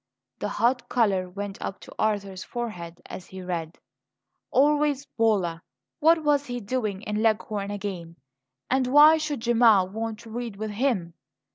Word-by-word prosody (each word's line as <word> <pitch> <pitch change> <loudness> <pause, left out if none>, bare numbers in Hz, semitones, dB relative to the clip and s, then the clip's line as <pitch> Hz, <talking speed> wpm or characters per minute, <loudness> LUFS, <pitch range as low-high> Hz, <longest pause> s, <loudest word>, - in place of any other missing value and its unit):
The - - -2
hot 245 +2 0
colour 195 -6 +1
went 200 +1 -6
up 195 - -5
to - - -12
Arthur's 200 -3 -1
forehead 175 -9 -6
as 185 - -9
he 185 0 -9
read. 170 -2 -4 0.7
Always 290 0 +2
Bolla! 200 -10 0 0.4
What 320 +1 +4
was 290 -1 +2
he 245 0 -3
doing 215 -3 -3
in 210 0 -2
Leghorn 215 -2 0
again? 190 -5 -5 0.5
And 260 -1 +1
why 300 +4 +7
should 300 -5 -3
Gemma 230 -5 +5
want 220 +3 -4
to 225 - -12
read 235 -2 -5
with 215 +1 -4
him? 205 -7 -1
220 Hz, 150 wpm, -26 LUFS, 195-250 Hz, 0.7 s, why